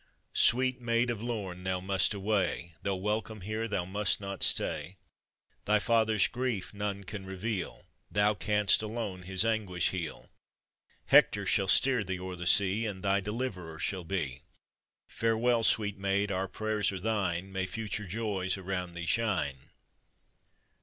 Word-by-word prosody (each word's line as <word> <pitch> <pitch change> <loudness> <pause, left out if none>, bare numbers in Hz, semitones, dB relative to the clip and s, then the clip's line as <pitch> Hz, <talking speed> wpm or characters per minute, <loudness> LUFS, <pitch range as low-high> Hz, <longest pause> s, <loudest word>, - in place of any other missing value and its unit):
"Sweet 130 +1 +3
Maid 120 0 +1
of 110 -3 -5
Lorn, 100 -7 -4
thou 95 0 -1
must 95 +2 +1
away. 95 -4 -1
Though 100 -1 -1
welcome 105 +2 -2
here, 110 +4 -3
thou 95 -5 -1
must 100 +1 +1
not 100 -2 -6
stay; 95 +2 +1 0.7
Thy 105 +1 +4
father's 110 -1 +3
grief 120 -7 -3
none 100 -1 -3
can 100 +1 -7
reveal, 95 +1 -4 0.2
Thou 105 +1 +3
can'st 105 +1 +3
alone 110 -4 -4
his 95 +3 +1
anguish 105 -6 +1
heal; 90 -4 -6 0.7
Hector - - +5
shall 95 - +2
steer 125 +3 +4
thee 95 -1 -3
o'er 90 0 -5
the 90 0 -4
sea, 100 +4 +3
And 95 -2 -6
thy 100 0 +3
deliverer 100 -6 -4
shall 95 +3 -2
be. 80 -8 -3 0.7
Farewell, 115 +1 +1
sweet 105 -3 +2
maid, 100 +1 0
our 95 0 -1
prayers 110 -2 -1
are 95 - -5
thine, 95 -3 -1
May 95 0 -2
future 105 +1 -4
joys 100 -2 -1
around 90 -2 -4
thee 85 0 -5
shine! 80 - 0
100 Hz, 145 wpm, -30 LUFS, 95-110 Hz, 0.7 s, Hector